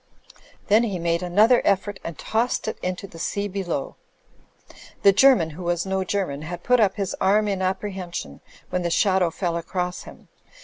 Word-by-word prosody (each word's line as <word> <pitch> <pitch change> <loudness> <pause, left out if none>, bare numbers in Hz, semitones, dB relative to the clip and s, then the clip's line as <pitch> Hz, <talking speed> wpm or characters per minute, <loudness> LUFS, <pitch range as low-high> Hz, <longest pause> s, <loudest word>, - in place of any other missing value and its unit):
Then 215 +2 +5
he 210 -6 -1
made 170 0 0
another 210 +7 +4
effort 200 0 0
and 165 -2 -6
tossed 230 +2 -1
it 220 - -4
into 185 +2 -3
the 165 -4 -12
sea 200 +4 -2
below. 185 -7 -4 1.1
The 200 - +7
German, 205 -8 +5
who 160 +5 -10
was 175 0 -1
no 190 0 -1
German, 180 -7 -2
had 175 +2 -7
put 250 0 +3
up 205 -4 +3
his 200 -3 -3
arm 210 +2 +3
in 195 -2 -1
apprehension 185 - -4 0.3
when 180 0 0
the 170 - -1
shadow 185 -1 +2
fell 170 0 -2
across 180 +1 -3
him. - - -14
185 Hz, 175 wpm, -23 LUFS, 175-205 Hz, 1.1 s, The